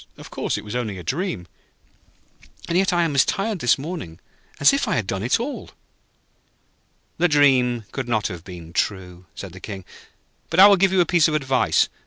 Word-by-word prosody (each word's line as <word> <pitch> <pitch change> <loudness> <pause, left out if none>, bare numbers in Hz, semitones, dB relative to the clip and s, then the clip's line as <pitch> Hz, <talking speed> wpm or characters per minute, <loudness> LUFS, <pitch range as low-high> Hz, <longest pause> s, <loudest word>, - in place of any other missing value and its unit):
Of - - -12
course, - - -2
it - - -8
was 105 - -7
only 110 -6 -3
a 90 - -8
dream, 165 - -3 1.2
and 170 - -2
yet 190 +1 +2
I 175 -1 +2
am 165 -3 -1
as 140 - +5
tired 200 0 -2
this 125 - +3
morning 135 - -7 0.4
as 140 - +6
if 275 - 0
I - - 0
had 110 -6 -1
done 95 0 -3
it 120 - +1
all.' 270 +5 -5 1.5
'The 175 - +4
dream 130 -6 +3
could 135 -2 -5
not 110 -3 0
have 90 -3 -5
been 85 -3 -11
true,' 90 -2 -3
said 95 -3 -8
the 95 - -11
King. 95 -1 -8 0.6
'But 165 - 0
I 195 - +11
will 200 0 +7
give 195 0 +2
you 190 -1 +3
a - - +3
piece 170 -2 +3
of 155 - -1
advice. 135 -3 +2
130 Hz, 205 wpm, -22 LUFS, -, 1.5 s, I